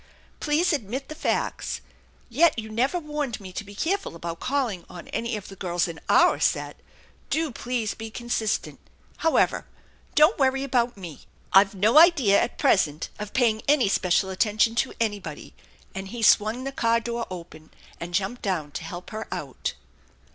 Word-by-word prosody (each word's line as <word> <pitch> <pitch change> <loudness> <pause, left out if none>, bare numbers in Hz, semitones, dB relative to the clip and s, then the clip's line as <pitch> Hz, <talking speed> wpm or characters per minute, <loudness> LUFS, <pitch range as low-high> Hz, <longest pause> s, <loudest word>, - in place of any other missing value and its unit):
Please 315 +4 +2
admit 260 +1 -3
the - - -5
facts. 315 - -2 0.5
Yet 310 +6 +3
you 220 -1 -5
never 255 +10 +1
warned 300 -6 -3
me 190 -2 -10
to 215 - -4
be 205 0 -12
careful 380 - -1
about 170 0 -6
calling 255 -10 -1
on 175 - -10
any 235 -1 -2
of 205 - -9
the 195 - -10
girls 175 -2 -1
in 165 -1 -7
our - - +5
set. - - 0 0.5
Do 320 -2 0
please 240 -2 -2
be 225 0 -7
consistent. 225 -2 -2 0.4
How 325 -1 +1
ever, - - +2 0.5
don't 305 +4 +5
worry 270 0 +2
about 245 -4 0
me. 170 -7 -10 0.3
I've 195 +1 +6
no 215 +9 +5
idea 290 - +6
at - - -2
present 155 -4 +2
of 210 -1 -6
paying 225 -4 +2
any 285 -6 +4
special 190 0 +1
attention 215 +3 +2
to 240 - +1
anybody," 205 -9 -3 0.4
and 190 0 -5
he 230 +3 -6
swung 215 +4 +4
the 275 - -3
car 230 -3 +2
door 235 0 -4 0.2
pen 155 0 -15 0.3
and 175 +1 -5
jumped 200 +5 -1
down 170 -7 -2
to 160 - -6
help 175 +4 -8
her 220 0 -5
out. 135 -3 -4
225 Hz, 170 wpm, -25 LUFS, 190-265 Hz, 0.5 s, I've